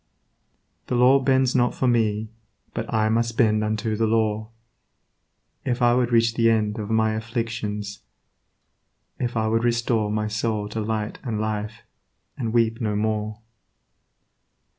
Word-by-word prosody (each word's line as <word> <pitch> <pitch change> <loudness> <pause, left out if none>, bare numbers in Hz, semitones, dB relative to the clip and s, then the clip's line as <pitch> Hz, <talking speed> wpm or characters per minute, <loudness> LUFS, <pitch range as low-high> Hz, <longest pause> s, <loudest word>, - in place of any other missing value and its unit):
The - - -1
law 125 +3 +6
bends 130 -1 +2
not 125 -1 +2
for 130 - 0
me, 110 -2 +1 0.4
but 115 - -4
I 110 -2 +2
must 115 0 0
bend 110 -2 +3
Unto 110 +1 -1
the 110 +1 +1
law, 110 -1 0 1.1
if 125 -2 -1
I 120 -1 +4
would 125 -1 +1
reach 115 -1 +3
the 115 0 +3
end 110 -1 +1
Of 105 -1 -5
my 110 -1 +2
afflictions, 110 -2 -4 1.2
if 120 -2 -2
I 110 0 +1
would 115 +1 +1
restore 115 -2 +1
My 105 0 -1
soul 105 -1 -1
to 110 +1 -3
Light 110 0 -3
and 115 -4 -3
Life, 110 +1 -3 0.5
and 115 -4 -3
weep 115 0 +1
no 105 -2 0
more. 105 0 -2
110 Hz, 145 wpm, -24 LUFS, 105-115 Hz, 1.2 s, law